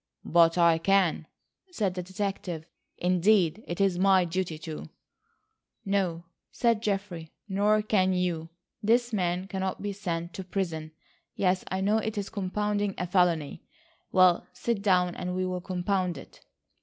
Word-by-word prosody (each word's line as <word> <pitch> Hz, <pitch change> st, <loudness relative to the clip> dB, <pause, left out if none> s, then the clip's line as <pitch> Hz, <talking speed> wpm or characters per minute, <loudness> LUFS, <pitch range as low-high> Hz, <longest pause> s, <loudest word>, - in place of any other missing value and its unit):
"But 165 Hz, 0 st, +4 dB
I 170 Hz, -2 st, +5 dB
can," 185 Hz, -3 st, +2 dB, 0.4 s
said 210 Hz, -, -1 dB
the 180 Hz, -, -4 dB
detective; 185 Hz, -3 st, -4 dB, 0.3 s
"indeed 180 Hz, +1 st, +2 dB
it 175 Hz, -, -4 dB
is 195 Hz, -3 st, +2 dB
my 190 Hz, -1 st, +5 dB
duty 175 Hz, -1 st, -2 dB
to." 155 Hz, -, -7 dB, 1.0 s
"No," 190 Hz, -4 st, 0 dB, 0.3 s
said 230 Hz, -3 st, +1 dB
Geoffrey, 195 Hz, -6 st, -3 dB, 0.2 s
"nor 210 Hz, +2 st, +2 dB
can 190 Hz, -3 st, +2 dB
you. 175 Hz, -3 st, -1 dB, 0.3 s
This 235 Hz, +2 st, +2 dB
man 180 Hz, -2 st, 0 dB
cannot 190 Hz, -1 st, -3 dB
be 205 Hz, -1 st, -2 dB
sent 170 Hz, -4 st, -4 dB
to 190 Hz, -, -6 dB
prison. 170 Hz, -4 st, -3 dB, 0.4 s
Yes, 185 Hz, -1 st, +1 dB
I 190 Hz, 0 st, -2 dB
know, 210 Hz, +3 st, +2 dB
it 220 Hz, 0 st, -4 dB
is 200 Hz, -1 st, -3 dB
compounding 205 Hz, 0 st, -1 dB
a 180 Hz, -, -2 dB
felony. 175 Hz, -5 st, +1 dB, 0.5 s
Well, 185 Hz, -2 st, +4 dB
sit 235 Hz, -4 st, -2 dB
down, 180 Hz, -3 st, +3 dB
and 180 Hz, +1 st, -4 dB
we'll 185 Hz, -1 st, -2 dB
compound 180 Hz, -1 st, -1 dB
it." -, -, -13 dB
185 Hz, 145 wpm, -28 LUFS, 175-200 Hz, 1.0 s, I